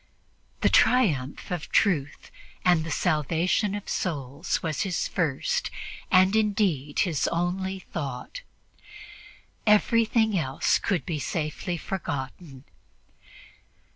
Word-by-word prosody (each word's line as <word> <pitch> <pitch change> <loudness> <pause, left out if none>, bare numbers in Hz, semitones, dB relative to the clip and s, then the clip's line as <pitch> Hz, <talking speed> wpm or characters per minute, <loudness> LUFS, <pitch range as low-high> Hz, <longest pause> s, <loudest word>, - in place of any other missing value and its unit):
The - - +4
triumph 160 - +2
of 175 -3 -4
truth 145 -9 +1 0.3
and 175 -3 +4
the 165 - -5
salvation 170 - +1
of 205 - -6
souls 145 -1 -2
was 160 -3 -1
his 190 -5 -1
first, 180 - -1 0.4
and 185 +1 +5
indeed 195 -10 +1
his 165 -6 +1
only 185 +3 -1
thought; 160 - -6 1.3
everything 220 0 +3
else 135 -7 +1
could 175 -9 -1
be 160 -4 -3
safely 160 +4 -3
forgotten. 145 -5 -5
175 Hz, 100 wpm, -26 LUFS, 150-195 Hz, 1.3 s, and